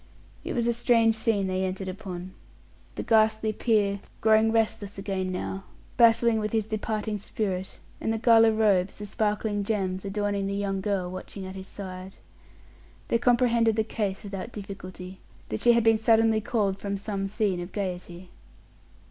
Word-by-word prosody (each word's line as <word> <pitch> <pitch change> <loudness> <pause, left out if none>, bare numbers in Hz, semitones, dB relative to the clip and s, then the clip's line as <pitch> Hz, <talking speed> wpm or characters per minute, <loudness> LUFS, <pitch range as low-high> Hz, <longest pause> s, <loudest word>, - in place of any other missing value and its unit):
It - - -4
was 235 -2 0
a 235 - +2
strange 230 -1 +3
scene 220 -3 +1
they 185 0 -1
entered 190 +1 -3
upon: 185 -1 -6 0.6
the - - -4
ghastly 220 -1 +3
peer, 205 -3 +1 0.2
growing 220 0 +4
restless 215 -3 0
again 190 -1 -2
now, 195 +1 -4 0.3
battling 230 -1 +5
with 215 0 -3
his 220 -2 +1
departing 215 0 -3
spirit, 190 -2 -3 0.2
and 225 - -1
the 225 - 0
gala 225 0 +6
robes, 200 -4 +2
the 210 - -6
sparkling 210 0 -1
gems 190 -3 -1
adorning 200 0 -1
the 200 - -2
young 195 -1 -2
girl 190 -3 -1
watching 190 +1 -7
at 190 - -7
his 190 0 -8
side. 185 -1 -8 0.9
They 230 - +2
comprehended 235 -2 +3
the 220 - +2
case 205 -3 -3
without 200 +2 -6
difficulty; 190 -2 -8 0.3
that - - -3
she 240 - +6
had 235 -1 +3
been 225 -1 +4
suddenly 225 0 +4
called 200 -3 0
from 200 0 -3
some 195 -1 -3
scene 200 -3 -1
of 175 +1 -7
gayety. 180 -2 -5
205 Hz, 165 wpm, -27 LUFS, 190-220 Hz, 0.9 s, gala